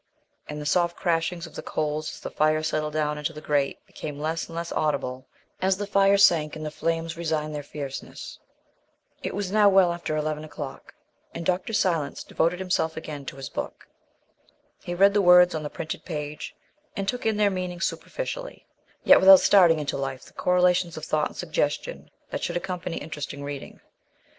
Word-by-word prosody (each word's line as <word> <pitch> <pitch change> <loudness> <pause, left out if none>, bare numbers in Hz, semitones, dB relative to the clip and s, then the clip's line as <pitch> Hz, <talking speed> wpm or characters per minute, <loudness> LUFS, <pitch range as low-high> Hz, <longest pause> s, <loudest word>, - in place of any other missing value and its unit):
And 150 0 -5
the 150 - -6
soft 170 +3 +2
crashings 170 0 0
of 165 - -12
the - - -6
coals 155 0 -2
as - - -10
the - - -6
fire 155 +1 +2
settled 155 -1 -1
down 150 -1 0
into 150 +2 -3
the 150 - -8
grate 145 -2 -1
became 150 -2 -7
less 160 +2 -2
and 165 - -10
less 170 0 -4
audible 130 -4 -1 0.3
as 190 0 +2
the 205 - -3
fire 200 0 +4
sank 165 -6 +4
and 155 0 -6
the 150 - -4
flames 165 +1 -2
resigned 155 -2 -2
their 150 - -3
fierceness. 140 -1 -7 0.8
It - - -4
was 200 -2 -3
now 210 -1 +6
well 190 -3 +5
after 170 -3 -3
eleven 155 0 -2
o'clock, 150 -3 -8 0.4
and 170 - -5
Dr. 180 +5 0
Silence 170 -9 0
devoted 170 +2 0
himself 175 -4 -1
again 150 -4 -7
to - - -5
his 135 -1 -6
book. - - -6 0.9
He 175 - -5
read 200 +2 +5
the 205 - +3
words 180 -1 +7
on 155 - -2
the 150 - -4
printed 155 - -6
page 150 -3 -5 0.4
and 195 -1 -3
took 245 +2 -1
in 220 -1 +1
their 205 -1 +3
meaning 180 -2 -4
superficially, - - -4 0.4
yet - - +8
without 190 0 +9
starting 175 -5 +6
into 150 -2 -2
life 135 -1 -4
the - - -17
correlations 180 -1 +2
of 155 - -5
thought 155 -1 +1
and - - -15
suggestion - - -2 0.2
that - - -3
should - - -1
accompany 180 -1 -4
interesting 145 -2 -6
reading. 145 -1 -7
165 Hz, 185 wpm, -26 LUFS, 150-180 Hz, 0.9 s, without